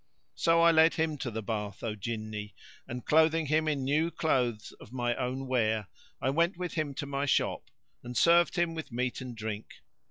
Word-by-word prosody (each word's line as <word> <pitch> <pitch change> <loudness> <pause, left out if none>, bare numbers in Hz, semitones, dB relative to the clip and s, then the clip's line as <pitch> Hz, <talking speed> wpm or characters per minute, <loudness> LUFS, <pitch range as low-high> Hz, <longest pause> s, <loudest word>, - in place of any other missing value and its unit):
So 165 0 +3
I 170 0 +7
led 160 0 +5
him 160 -1 0
to 125 - -3
the 110 -1 -5
bath, 105 -2 -4
O 110 -2 -2
Jinni, 110 0 -5 0.3
and 125 -1 -6
clothing 160 +1 +4
him 155 +2 +1
in 145 -3 0
new 150 +5 +2
clothes 125 -9 0
of - - -13
my 120 -2 0
own 130 +1 -3
wear, 110 -5 0 0.3
I 130 - 0
went 170 +4 +1
with 180 -1 -4
him 150 -4 -2
to 145 - -4
my 140 0 -2
shop - - 0 0.3
and 125 0 -5
served 170 +1 +5
him 175 -2 +1
with 160 -5 -6
meat 125 +1 -2
and 125 -2 -7
drink. 110 -1 -4
130 Hz, 195 wpm, -30 LUFS, 115-160 Hz, 0.3 s, I